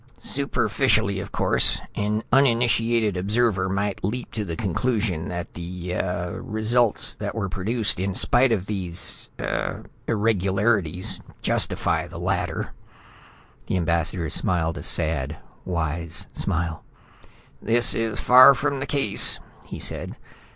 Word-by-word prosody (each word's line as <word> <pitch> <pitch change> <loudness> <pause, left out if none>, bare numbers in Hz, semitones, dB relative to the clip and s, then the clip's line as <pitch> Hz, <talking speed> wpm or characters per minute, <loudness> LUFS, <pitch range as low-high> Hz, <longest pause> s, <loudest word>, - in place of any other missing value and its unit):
"Superficially, 110 -6 0
of 100 0 -7
course, - - +3
an 105 +2 -1
uninitiated 115 -4 +3
observer 100 0 +1
might 100 +1 -2
leap 120 +6 -3
to 110 - -3
the 85 -4 -5
conclusion 100 -3 -1
that 90 -1 -6
the 90 +1 -6
ah 90 -1 -2
results 110 +1 +1
that - - -5
were 105 -4 -2
produced 105 +3 0
in 95 0 -2
spite 125 +4 +4
of 100 -5 0
these... 95 -4 -4
ah... - - -3 0.3
irregularities 100 -4 0 0.2
justify - - +1
the - - -10
latter." - - -2 0.9
The - - 0
Ambassador 85 -1 0
smiled 85 -3 0
a - - -7
sad, 80 -2 +1 0.3
wise 85 -2 -3
smile. 80 -1 -2 0.8
"This 120 0 +3
is 115 -2 -2
far 130 +2 +8
from 140 0 -1
the 140 - -4
case," 135 -7 +3 0.3
he - - -7
said. - - -3
100 Hz, 125 wpm, -24 LUFS, 90-115 Hz, 0.9 s, far